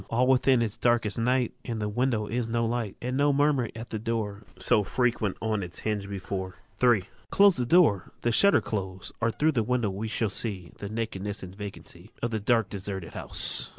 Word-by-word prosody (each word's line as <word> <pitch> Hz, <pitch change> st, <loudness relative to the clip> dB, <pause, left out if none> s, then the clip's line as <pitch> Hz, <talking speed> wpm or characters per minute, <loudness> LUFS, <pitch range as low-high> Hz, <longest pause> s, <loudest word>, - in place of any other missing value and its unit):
II. -, -, -14 dB
All 120 Hz, +2 st, +2 dB
within 130 Hz, -1 st, +4 dB
is 110 Hz, -2 st, -4 dB
dark 120 Hz, -1 st, +2 dB
as 105 Hz, +2 st, -2 dB
night: 125 Hz, +1 st, +1 dB
In 115 Hz, -2 st, -4 dB
the 105 Hz, -1 st, -2 dB
windows 110 Hz, -1 st, 0 dB
is 120 Hz, 0 st, -1 dB
no 115 Hz, 0 st, +1 dB
light; 115 Hz, -3 st, -2 dB
And 125 Hz, +1 st, -2 dB
no 145 Hz, +1 st, +3 dB
murmur 140 Hz, -4 st, +2 dB
at 115 Hz, +1 st, -8 dB
the 110 Hz, -, -3 dB
door, 105 Hz, -2 st, -3 dB, 0.2 s
So 105 Hz, -, +2 dB
frequent 115 Hz, -3 st, 0 dB
on 110 Hz, -2 st, 0 dB
its 90 Hz, -1 st, -7 dB
hinge 105 Hz, -2 st, -2 dB
before. 95 Hz, -1 st, -5 dB, 0.3 s
III. 115 Hz, -6 st, +4 dB, 0.2 s
Close 200 Hz, -2 st, +5 dB
the 125 Hz, -1 st, -1 dB
door, 120 Hz, -, +4 dB
the 120 Hz, -, +1 dB
shutters 200 Hz, -, +4 dB
close, 95 Hz, -3 st, -4 dB
Or 115 Hz, -, +2 dB
throÆ 155 Hz, +7 st, +1 dB
the 120 Hz, -, +2 dB
windows 115 Hz, -3 st, 0 dB
we 105 Hz, +4 st, -4 dB
shall 110 Hz, -1 st, -1 dB
see 100 Hz, -4 st, -3 dB
The 100 Hz, -, -5 dB
nakedness 105 Hz, -2 st, -4 dB
and 95 Hz, 0 st, -8 dB
vacancy 100 Hz, -2 st, -9 dB
Of 120 Hz, -, 0 dB
the 110 Hz, -, -1 dB
dark 115 Hz, 0 st, +2 dB
deserted 95 Hz, -4 st, -6 dB
house. -, -, +3 dB
110 Hz, 210 wpm, -27 LUFS, 100-120 Hz, 0.3 s, Close